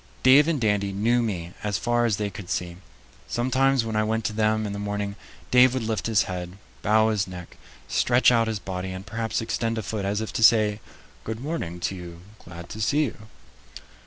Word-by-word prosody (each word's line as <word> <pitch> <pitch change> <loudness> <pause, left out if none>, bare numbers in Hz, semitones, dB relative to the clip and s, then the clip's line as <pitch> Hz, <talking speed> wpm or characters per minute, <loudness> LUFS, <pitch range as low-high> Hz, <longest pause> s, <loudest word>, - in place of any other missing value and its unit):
Dave 140 +4 +7
and 165 -4 +1
Dandy 105 -3 +1
knew 115 +5 +2
me 90 -6 -3
as 105 -2 -1
far 120 +5 +1
as 110 -4 +1
they 105 -1 -2
could 100 -3 -9
see; 85 -2 -3 0.5
sometimes 130 +1 +1
when 110 -1 -3
I 110 - +2
went 110 0 -1
to 110 - -1
them 110 0 +1
in 100 - -4
the 100 - -5
morning, 100 0 -3 0.4
Dave 125 0 +6
would 130 - -1
lift 110 0 -2
his 110 -2 +3
head, 90 0 -6 0.2
bow 110 +1 +3
his 105 -3 0
neck, 90 -2 -9 0.3
stretch 125 +1 +3
out 115 -2 +3
his 110 -1 -1
body, 95 -1 -5
and 95 +1 -8
perhaps 110 0 -2
extend 115 0 -2
a 110 - -2
foot, 105 0 -3
as 100 +2 -1
if 110 - -5
to 115 - 0
say, 110 -2 +5 0.4
"Good 110 0 -5
morning 130 - -4
to 90 - -1
you; 85 -2 -9 0.2
glad 85 0 -10
to 110 - -6
see 145 +8 +2
you." 130 - -4
110 Hz, 210 wpm, -25 LUFS, 100-115 Hz, 0.5 s, Dave